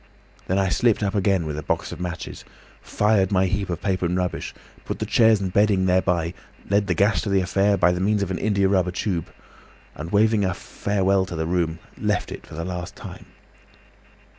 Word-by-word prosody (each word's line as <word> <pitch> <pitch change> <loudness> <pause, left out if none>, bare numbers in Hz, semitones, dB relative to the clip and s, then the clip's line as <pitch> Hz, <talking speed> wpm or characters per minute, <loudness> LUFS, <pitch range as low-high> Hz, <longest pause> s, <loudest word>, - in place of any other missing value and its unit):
Then 95 - +1
I 95 -1 +2
slipped 115 +2 +2
up 100 -1 0
again 95 -4 +1
with 75 -1 -4
a - - -4
box - - -2
of - - -7
matches, 90 -1 -6 0.4
fired 105 -2 +1
my 95 -1 +3
heap 100 +1 -1
of 85 -1 -4
paper 95 -3 0
and 90 +1 -1
rubbish, 90 -1 -2 0.3
put - - -4
the - - -3
chairs 110 -2 +4
and 95 -2 -3
bedding 100 -2 +3
thereby, 90 -2 +1 0.3
led 100 0 +2
the 90 - +1
gas 100 +5 +2
to 105 - -3
the 100 -1 +3
affair, 100 +2 +2
by 90 -1 +4
means 100 +3 +1
of 95 - -4
an 90 - -2
india 100 -2 +2
rubber 95 -2 +2
tube, 90 -2 -2 0.7
and 80 +4 -7
waving 110 0 +3
a 95 -2 0
farewell 95 -1 0
to 85 - -6
the 80 0 -2
room 85 -1 0 0.2
left - - -1
it - - -8
for - - -10
the 85 +1 -4
last 90 -1 -5
time." - - -10
95 Hz, 205 wpm, -23 LUFS, 90-100 Hz, 0.7 s, chairs